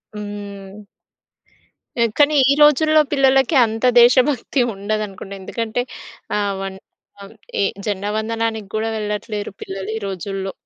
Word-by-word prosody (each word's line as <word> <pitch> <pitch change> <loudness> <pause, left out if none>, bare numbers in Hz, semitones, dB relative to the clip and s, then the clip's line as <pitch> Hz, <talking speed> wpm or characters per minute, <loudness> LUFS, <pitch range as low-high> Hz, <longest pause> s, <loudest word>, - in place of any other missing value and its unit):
హ్మ్. 205 -1 -8 1.2
పె 235 - +3
కాని, 295 +1 +4 0.2
ఈ - - +6
రోజుల్లో 310 +1 +5
పిల్లలకి 270 +1 +3
అంత 225 +2 -3 0.2
దేశభక్తి 255 +2 +3
ఉండదనుకుంటా. 200 -1 -4
ఎందుకంటే 225 +4 -3 0.6
ఆహ్, 205 -1 0
వన్ 195 0 -5 0.4
ఆహ్, 200 +2 -11 0.3
ఎ - - +3 0.2
జెండా 205 0 -2
వందనానికి 225 -1 -2
గూడా 220 +1 -1
వెళ్ళట్లేరు 210 -1 -4
పిల్లలు 195 +1 -6
ఈ - - -4
రోజుల్లో. 195 +1 -4
215 Hz, 120 wpm, -20 LUFS, 200-240 Hz, 1.2 s, ఈ